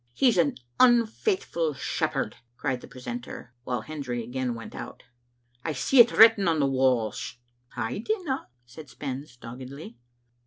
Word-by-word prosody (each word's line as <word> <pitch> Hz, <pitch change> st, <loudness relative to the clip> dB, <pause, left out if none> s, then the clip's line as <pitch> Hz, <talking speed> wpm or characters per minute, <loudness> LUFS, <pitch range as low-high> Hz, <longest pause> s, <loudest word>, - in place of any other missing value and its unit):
" 120 Hz, -, -40 dB
He's 235 Hz, -, +3 dB
an 160 Hz, -4 st, +2 dB, 0.2 s
unfaithful 235 Hz, -, +2 dB
shepherd/' -, -, -1 dB, 0.2 s
cried 130 Hz, -3 st, -2 dB
the -, -, -11 dB
precentor, 125 Hz, 0 st, -8 dB
while 125 Hz, -3 st, -2 dB
Hendry 130 Hz, -4 st, -4 dB
again 125 Hz, +1 st, -3 dB
went 115 Hz, -, -9 dB
out. -, -, -8 dB, 0.6 s
I 160 Hz, -, -2 dB
see 250 Hz, -, +2 dB
it 235 Hz, 0 st, +9 dB
written 220 Hz, -3 st, +7 dB
on 165 Hz, -2 st, +2 dB
the 140 Hz, -, +3 dB
walls." 130 Hz, -4 st, 0 dB, 0.2 s
* 120 Hz, -, -44 dB
" -, -, -29 dB
I 115 Hz, -, -2 dB
dinna," 325 Hz, -, -2 dB, 0.2 s
said 135 Hz, +4 st, -12 dB
Spens 135 Hz, -2 st, -6 dB
doggedly. 125 Hz, +1 st, -9 dB
135 Hz, 155 wpm, -27 LUFS, 125-185 Hz, 0.6 s, it